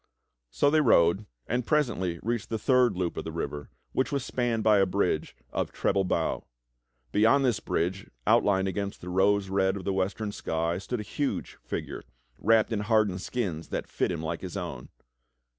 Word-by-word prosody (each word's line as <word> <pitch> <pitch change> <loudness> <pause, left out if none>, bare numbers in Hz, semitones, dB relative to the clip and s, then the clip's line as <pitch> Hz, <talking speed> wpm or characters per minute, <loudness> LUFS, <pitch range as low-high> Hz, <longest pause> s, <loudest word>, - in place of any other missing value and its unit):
So - - +2
they 155 0 +4
rode 95 - +4 0.2
and 125 +2 -1
presently 115 - 0
reached 115 0 -2
the 110 - -1
third 125 -3 +3
loop 90 -2 -2
of - - -2
the - - -5
river, 75 0 -4 0.2
which 130 - 0
was 140 -3 -1
spanned 120 -3 -1
by 105 -2 +5
a 95 - +4
bridge 90 -4 0 0.2
of - - -2
treble 95 -1 +1
bow. 85 -3 0 0.7
Beyond 125 +7 +4
this 120 -5 +2
bridge, 95 +4 -2 0.2
outlined 95 -1 +3
against 100 +1 -3
the 90 - -7
rose 95 +1 +2
red 95 0 +1
of 95 - -7
the 100 - 0
western 100 +3 -1
sky, 85 -3 -2
stood 115 +3 -3
a - - -5
huge 140 +6 -3
figure - - -5 0.4
wrapped 110 +2 +3
in 105 - 0
hardened 105 -3 +2
skins 95 -11 -3
that - - -3
fit - - -1
him 85 -2 -4
like 80 +1 -3
his 95 -1 -6
o^vn. 90 -3 -5
100 Hz, 180 wpm, -28 LUFS, 90-115 Hz, 0.7 s, by